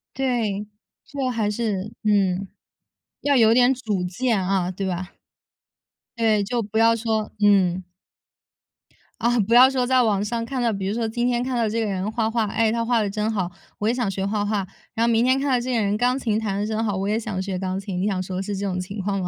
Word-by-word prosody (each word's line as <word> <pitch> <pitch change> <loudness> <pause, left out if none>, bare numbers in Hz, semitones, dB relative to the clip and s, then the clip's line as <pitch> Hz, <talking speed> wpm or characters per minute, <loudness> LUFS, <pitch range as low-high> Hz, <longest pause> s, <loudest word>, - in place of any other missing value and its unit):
对， 225 -6 -1 0.4
就 275 -3 -3
还 225 -4 0
是 210 -2 -2
嗯。 195 -2 +2 0.7
要 285 -2 +3
有 225 -1 +6
点 250 +2 +5
主 215 -8 -2
见， 220 +5 0
啊， 185 -2 0
对 195 +1 -4
吧？ 185 0 -4 1.0
对， 220 -3 +2
就 235 +3 -1
不 210 +2 -3
要 230 0 +5
说 220 -1 -2
嗯。 190 -3 +3 1.4
啊， 240 0 +2
不 215 +3 +1
要 255 +2 +8
说 260 -2 0
在 255 0 +3
网 205 -3 +1
上 230 +2 -2
看 260 0 -3
到， 235 -2 +2
比 195 -1 -3
如 200 - -1
说 230 -1 -1
今 240 +2 -1
天 245 0 +1
看 255 -1 -2
到 230 -2 +1
这 225 +2 -1
个 225 - 0
人 195 +1 -2
画 220 -1 0
画， 225 -1 0
哎， 220 +2 +1
他 230 0 0
画 235 -1 +2
得 205 - -1
真 215 +2 -1
好， 185 -4 -2 0.3
我 210 - -1
也 235 - +3
想 245 -5 -1
学 195 0 -2
画 205 +1 -1
画。 205 -2 -1 0.3
然 230 +1 +2
后 235 - +2
明 230 +1 +3
天 260 +1 +3
看 285 - -1
到 250 -2 +3
这 255 +1 -3
个 230 - +2
人 205 0 +1
钢 250 +3 +2
琴 220 -5 0
弹 200 -2 -2
得 205 - -1
真 220 +1 -1
好， 205 -3 -1
我 195 +1 -2
也 215 +2 +1
想 210 -4 -4
学 190 -1 -3
钢 185 0 -2
琴。 195 -2 -4
你 200 - +1
想 190 -3 -1
说 185 0 -5
的 - - -1
是 205 0 -3
这 200 - -3
种 185 -2 -2
情 195 +3 -6
况 195 +1 -1
吗？ 180 - -2
215 Hz, 260 characters per minute, -23 LUFS, 195-235 Hz, 1.4 s, 要